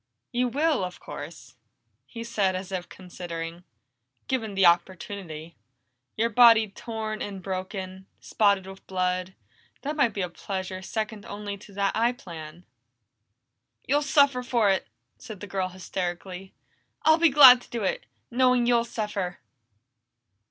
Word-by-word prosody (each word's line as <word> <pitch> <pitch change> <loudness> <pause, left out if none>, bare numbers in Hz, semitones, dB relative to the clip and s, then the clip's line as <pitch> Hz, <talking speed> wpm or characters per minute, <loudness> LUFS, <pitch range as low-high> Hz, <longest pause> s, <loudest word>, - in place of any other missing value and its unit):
"You 250 +1 +1
will, 290 -2 +1
of 180 -1 -5
course," - - -9 0.5
he 230 -1 -7
said 205 -5 0
as 185 +1 -5
if 180 -2 -4
considering. 175 -2 -7 0.6
"Given 225 -6 -2
the 195 -1 +4
opportunity. 170 -2 0 0.6
Your 230 +2 +1
body 225 -2 +7
torn 220 +1 -5
and 200 -2 -5
broken, 190 0 -5
spotted 200 -3 +2
with 190 0 -12
blood 185 0 -1 0.5
that 295 +2 -2
might 255 -8 +2
be 200 - -1
a 180 - -2
pleasure 185 +1 -5
second 215 +1 -4
only 205 0 -5
to 200 0 -15
that 200 0 0
I 235 +2 +2
plan." 170 -5 -10 1.2
"You'll 290 +3 +2
suffer 280 -2 +3
for 235 -5 +2
it!" 190 - -1 0.3
said 215 -5 -9
the 205 - -7
girl 190 -2 -2
hysterically. 185 +1 -5 0.5
"I'll 315 +1 +5
be 335 -1 +6
glad 260 -3 +9
to - - -17
do 235 -3 -3
it, 190 - -2 0.2
knowing 250 0 +3
you'll 235 -1 +3
suffer!" 205 -6 -3
200 Hz, 140 wpm, -26 LUFS, 185-235 Hz, 1.2 s, glad